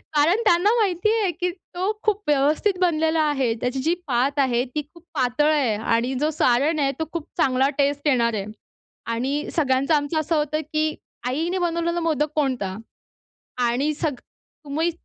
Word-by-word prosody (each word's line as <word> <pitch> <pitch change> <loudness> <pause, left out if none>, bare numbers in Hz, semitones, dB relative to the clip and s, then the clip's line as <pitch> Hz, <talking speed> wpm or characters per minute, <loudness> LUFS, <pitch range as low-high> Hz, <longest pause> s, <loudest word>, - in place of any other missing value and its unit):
कारण 330 +9 +3
त्यांना 355 +1 +4
माहिती 400 0 +1
आहे, 385 -4 +1
की 355 +2 -2
तो 365 +2 -4
खूप 425 -1 +1
व्यवस्थित 300 +7 +2
बनलेला 320 -2 +2
आहे. 270 -6 +1
त्याची 250 +2 -1
जी 325 +6 +1
पात 270 +3 +1
आहे 250 -3 +2
ती 300 - +1
खूप 340 - -17
पातळ 255 +5 +2
आहे 270 -8 +2
आणि 230 +4 0
जो 300 +2 +1
सारण 290 +3 +2
आहे 275 -1 +2
तो 320 - 0
खूप 335 -3 -4
चांगला 265 +1 +3
टेस्ट 285 +1 +1
येणार 235 -4 +3
आहे. 200 -2 -3 0.6
आणि 260 +6 -2
सगळ्यांचं 275 -1 +2
आमचं 295 +2 +1
असं 310 +2 0
होतं, 305 0 0
की 310 0 +1 0.3
आईने 325 +8 -1
बनवलेला 340 0 0
मोदक 310 -2 0
कोणता? 255 -10 -1 0.8
आणि 250 +5 +1
सग 300 -1 -2 0.5
तुम्ही 310 +4 0
295 Hz, 165 wpm, -23 LUFS, 265-330 Hz, 0.8 s, त्यांना